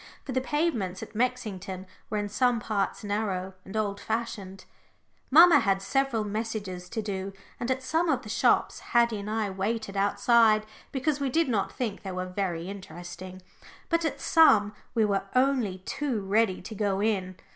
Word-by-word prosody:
For 270 Hz, -, -4 dB
the 260 Hz, 0 st, +1 dB
pavements 255 Hz, -, -1 dB
at -, -, -10 dB
Mexington 210 Hz, -6 st, -2 dB, 0.2 s
were 215 Hz, -, -1 dB
in 205 Hz, 0 st, -1 dB
some 240 Hz, +3 st, +2 dB
parts 215 Hz, 0 st, -2 dB
narrow 200 Hz, -3 st, -2 dB
and 200 Hz, +3 st, -6 dB
old 200 Hz, -2 st, -1 dB
fashioned. 205 Hz, -4 st, -4 dB, 0.6 s
Mamma 330 Hz, +1 st, +8 dB
had 195 Hz, -5 st, +2 dB
several 245 Hz, +2 st, 0 dB
messages 205 Hz, -4 st, -4 dB
to 220 Hz, -, -3 dB
do, 195 Hz, -1 st, -4 dB, 0.3 s
and 240 Hz, -, -3 dB
at 260 Hz, 0 st, 0 dB
some 325 Hz, +5 st, +1 dB
of -, -, +1 dB
the -, -, -10 dB
shops -, -, +2 dB
Haddie 235 Hz, -3 st, +2 dB
and 200 Hz, +1 st, -6 dB
I 215 Hz, -2 st, -1 dB
waited 200 Hz, +2 st, -2 dB
outside 215 Hz, +2 st, +4 dB, 0.3 s
because 285 Hz, +2 st, 0 dB
we 280 Hz, -1 st, 0 dB
did 325 Hz, +5 st, +2 dB
not 210 Hz, -5 st, 0 dB
think 220 Hz, -5 st, -3 dB
they 190 Hz, -, -5 dB
were 185 Hz, 0 st, -3 dB
very 180 Hz, -2 st, -3 dB
interesting. 185 Hz, -1 st, -9 dB, 0.5 s
But 335 Hz, -1 st, +2 dB
at 320 Hz, -, -2 dB
some 215 Hz, -11 st, +5 dB, 0.2 s
we 225 Hz, -2 st, +4 dB
were 200 Hz, -2 st, 0 dB
only 250 Hz, -8 st, +1 dB
too 265 Hz, -8 st, -2 dB
ready 195 Hz, -1 st, +1 dB
to 220 Hz, -, -7 dB
go 200 Hz, -2 st, 0 dB
in. 195 Hz, -3 st, 0 dB
215 Hz, 170 wpm, -28 LUFS, 195-245 Hz, 0.6 s, Mamma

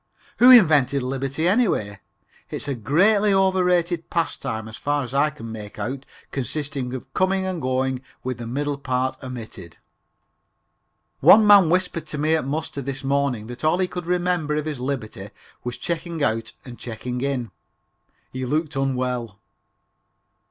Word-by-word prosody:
Who 245 Hz, -, +8 dB
invented 150 Hz, -, +6 dB
liberty, 135 Hz, +5 st, -2 dB
anyway? 180 Hz, -, +1 dB, 0.5 s
It's -, -, -3 dB
a 140 Hz, -, -1 dB
greatly 195 Hz, -, +3 dB
over 190 Hz, -1 st, +3 dB
rated 175 Hz, -1 st, +1 dB
pastime 110 Hz, -9 st, -2 dB
as 110 Hz, -, -9 dB
far 145 Hz, +1 st, -1 dB
as 125 Hz, 0 st, -8 dB
I 145 Hz, +2 st, +3 dB
can 130 Hz, -7 st, -9 dB
make 105 Hz, -2 st, -8 dB
out, 135 Hz, +2 st, -5 dB, 0.2 s
consisting 135 Hz, -1 st, -3 dB
of 130 Hz, -, -9 dB
coming 190 Hz, 0 st, +1 dB
and 185 Hz, -3 st, -3 dB
going 130 Hz, 0 st, -1 dB, 0.2 s
with 130 Hz, -1 st, -4 dB
the 120 Hz, -, -6 dB
middle 145 Hz, +3 st, -2 dB
part 130 Hz, -1 st, -2 dB
omitted. 115 Hz, -, -9 dB, 1.4 s
One 215 Hz, +1 st, +7 dB
man 200 Hz, -5 st, +7 dB
whispered 180 Hz, -3 st, 0 dB
to 150 Hz, -, -4 dB
me 155 Hz, +2 st, +1 dB
at 155 Hz, -4 st, -2 dB
muster 150 Hz, 0 st, -3 dB
this 135 Hz, +1 st, -5 dB
morning 135 Hz, -5 st, 0 dB
that 120 Hz, +4 st, -9 dB
all 155 Hz, +3 st, +3 dB
he 185 Hz, 0 st, +1 dB
could 180 Hz, -2 st, -6 dB
remember 175 Hz, -4 st, 0 dB
of 150 Hz, 0 st, -2 dB
his 150 Hz, -4 st, -4 dB
liberty 120 Hz, -7 st, -4 dB, 0.3 s
was 125 Hz, -1 st, -4 dB
checking 170 Hz, -2 st, -3 dB
out 110 Hz, -2 st, -1 dB
and 120 Hz, -2 st, -10 dB
checking 125 Hz, +1 st, -5 dB
in. 130 Hz, -4 st, -2 dB, 0.8 s
He 130 Hz, 0 st, -4 dB
looked 150 Hz, +4 st, -1 dB
unwell. 125 Hz, -5 st, -2 dB
140 Hz, 155 wpm, -23 LUFS, 125-170 Hz, 1.4 s, Who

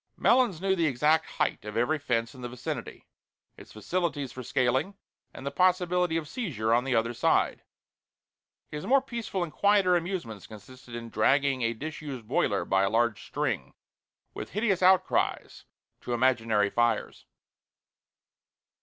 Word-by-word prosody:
Melons 240 Hz, -9 st, +3 dB
knew 190 Hz, +1 st, +1 dB
the 170 Hz, -3 st, +1 dB
exact 150 Hz, +4 st, +2 dB
height -, -, -2 dB
of 105 Hz, +1 st, -6 dB
every 150 Hz, +7 st, +1 dB
fence 115 Hz, -5 st, -1 dB
in 130 Hz, -, -12 dB
the 120 Hz, -, -5 dB
vicinity, 125 Hz, 0 st, -6 dB, 0.5 s
its -, -, -14 dB
facilities 145 Hz, +2 st, -2 dB
for 130 Hz, -, -8 dB
scaling, 130 Hz, -, 0 dB, 0.4 s
and 130 Hz, -, -10 dB
the 140 Hz, -, -2 dB
possibility 180 Hz, -2 st, +2 dB
of 160 Hz, -2 st, -4 dB
seizure 140 Hz, -, -2 dB
on 120 Hz, +2 st, +2 dB
the 135 Hz, -2 st, 0 dB
other 115 Hz, +1 st, +1 dB
side. -, -, +1 dB, 1.1 s
His 150 Hz, 0 st, -6 dB
more 275 Hz, +2 st, +5 dB
peaceful 230 Hz, -8 st, -3 dB
and 165 Hz, -, -6 dB
quieter 195 Hz, +3 st, +3 dB
amusements 170 Hz, -, -4 dB
consisted 120 Hz, +3 st, -12 dB
in 115 Hz, 0 st, -7 dB
dragging 135 Hz, +4 st, +2 dB
a 115 Hz, 0 st, +1 dB
disused 140 Hz, -3 st, -7 dB
boiler -, -, +1 dB
by 95 Hz, 0 st, +2 dB
a 100 Hz, -, +2 dB
large 115 Hz, -2 st, +1 dB
string, -, -, -3 dB, 0.6 s
with -, -, -7 dB
hideous 205 Hz, -2 st, +1 dB
outcries, 185 Hz, 0 st, +2 dB, 0.4 s
to 120 Hz, -, -4 dB
imaginary 115 Hz, -5 st, +2 dB
fires. 120 Hz, 0 st, 0 dB
140 Hz, 145 wpm, -28 LUFS, 120-180 Hz, 1.1 s, more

